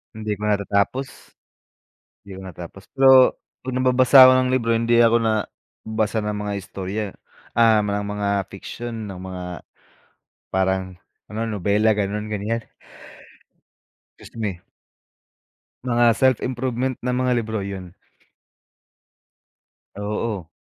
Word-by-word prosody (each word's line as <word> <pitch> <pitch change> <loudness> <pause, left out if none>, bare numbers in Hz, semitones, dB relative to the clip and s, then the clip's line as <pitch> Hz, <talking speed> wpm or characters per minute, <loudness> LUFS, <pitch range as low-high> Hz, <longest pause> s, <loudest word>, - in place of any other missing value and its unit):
Hindi 110 -1 -4
ko 105 - -2
natatapos. 100 +6 -1 0.9
'Di 100 - -9
ko 95 - -9
natapos, 90 +1 -10
pero 130 -1 +6 0.2
'pag 130 - -4
nagbabasa 130 +1 +4
ako 130 - +7
ng 130 0 +2
libro, 115 -3 +1
hindi 115 +1 +2
ako 115 0 +5
na 110 -2 0 0.4
basa 110 0 -1
ng 105 -1 -2
mga 105 0 -3
istorya, 95 +2 -5 0.5
ah, 115 -2 +5
ma 100 0 -1
ng - - -6
mga 100 -1 -1 0.2
fiction, 115 +3 -7
ng 95 -3 -8
mga, 95 -1 -7 1.1
parang, 95 0 0 0.3
ano, 110 - -7
nobela, 105 +1 +1
ganoon, 105 +1 -2
ganiyan. 105 +2 -2 1.6
Excuse - - -14
me. 100 -5 -3 1.2
Mga 120 -2 +3
self-improvement 130 0 0
na 125 - 0
mga 125 0 0
libro, 110 -2 -2
'yon. 95 -2 -6 2.1
Oo. 105 -3 -3
110 Hz, 115 wpm, -22 LUFS, 100-120 Hz, 2.1 s, ako